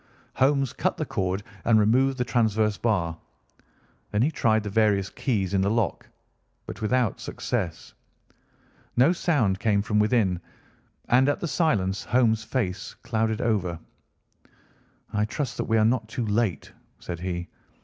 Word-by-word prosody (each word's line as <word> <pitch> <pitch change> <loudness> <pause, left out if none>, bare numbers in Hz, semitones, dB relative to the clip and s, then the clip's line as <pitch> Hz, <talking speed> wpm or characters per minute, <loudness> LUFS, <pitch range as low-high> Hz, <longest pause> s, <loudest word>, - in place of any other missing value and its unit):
Holmes 135 -1 +2
cut - - -1
the - - -2
cord 95 +1 -2 0.2
and 115 -2 +4
removed 130 +6 +3
the 125 - 0
transverse 110 -3 +1
bar. 90 -9 0 0.9
Then 105 +2 +1
he 150 - +2
tried 110 -7 +2
the 105 - -4
various 105 -3 +2
keys 100 -7 -1
in 95 - +3
the 100 - +2
lock, 115 -1 -1 0.6
but - - -8
without 120 0 +1
success. - - -4 1.0
No 135 +8 +5
sound 125 - +1
came 100 -2 +2
from 105 0 +1
within, 105 -5 +2 0.7
and 130 +3 +5
at 145 - 0
the 170 - -3
silence 105 - 0
Holmes' 115 -2 +2
face 105 -5 -3
clouded 110 -1 -1
over. 95 -7 0 1.4
"I 105 0 +1
trust 135 +5 -4
that 120 - -1
we 115 - +2
are 110 - +4
not 115 -1 +1
too 115 +1 -3
late," 105 -7 -1 0.3
said 85 -2 -6
he. 90 -1 -4
110 Hz, 150 wpm, -26 LUFS, 100-125 Hz, 1.4 s, No